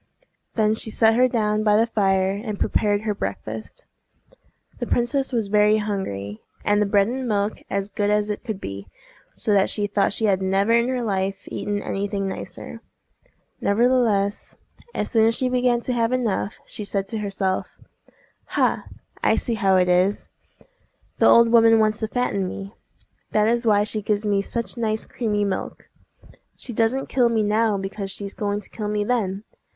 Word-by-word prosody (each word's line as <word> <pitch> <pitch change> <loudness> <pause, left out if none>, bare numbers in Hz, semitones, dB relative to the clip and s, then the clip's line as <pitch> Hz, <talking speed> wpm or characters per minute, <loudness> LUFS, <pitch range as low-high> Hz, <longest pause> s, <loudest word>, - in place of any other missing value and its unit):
Then 215 -1 +3
she 220 - -2
set 220 0 +3
her 250 +2 +4
down 215 -3 0
by 210 -1 +4
the 225 - +4
fire, 195 -4 +1
and 205 +1 -5
prepared 205 -1 +1
her 215 -1 -1
breakfast. - - -6 0.9
The - - -3
princess 265 +3 0
was 230 -4 0
very 210 +1 +4
hungry, 110 - -4 0.2
and 205 0 +3
the 210 - +2
bread 200 0 +3
and 255 +2 -3
milk 205 -1 -1
as 200 +1 -2
good 205 +1 0
as 210 0 +1
it 205 - -5
could 220 -6 -4
be, 100 - -7 0.4
so 210 - 0
that 195 -1 +3
she 205 - 0
thought 200 -1 +1
she 220 - 0
had 195 -2 +2
never 195 +3 +1
in 235 +1 +4
her 255 -2 -1
life 195 -2 -2
eaten 205 0 -3
any 200 +1 -2
thing 195 -1 -2
nicer. 190 - -7 0.8
Nevertheless, 215 -2 +1 0.4
as 210 - -2
soon 225 -1 +4
as 230 - +3
she 255 +1 +1
began 250 -1 +2
to 250 - -2
have 230 -1 +1
enough, 230 -5 -1
she 210 - -7
said 200 -1 -2
to 220 - -3
herself,— 195 -2 -2 0.9
"Ha! - - +1 0.4
I - - +4
see 240 - -1
how 195 -3 +2
it 180 -1 +3
is! 180 +3 +1 0.9
The - - +5
old 235 0 +6
woman 225 -1 +6
wants 215 0 +2
to 220 - -1
fatten 210 -5 -1
me! 195 +2 -7 0.6
That 210 0 +3
is 235 +1 +1
why 205 -1 +4
she 215 +1 -1
gives 210 +1 -1
me 200 -1 +2
such 235 +4 -4
nice 220 -2 -1
creamy 210 -4 -1
milk. 195 -1 -4 0.7
She 245 - -7
doesn't 230 +5 +1
kill 245 -2 +2
me 225 -2 +1
now 215 0 +2
because 195 +1 -5
she's 200 0 -4
going 205 0 -2
to - - -13
kill 210 -2 -4
me 210 0 0
then! 205 -4 -1
210 Hz, 180 wpm, -23 LUFS, 200-230 Hz, 0.9 s, old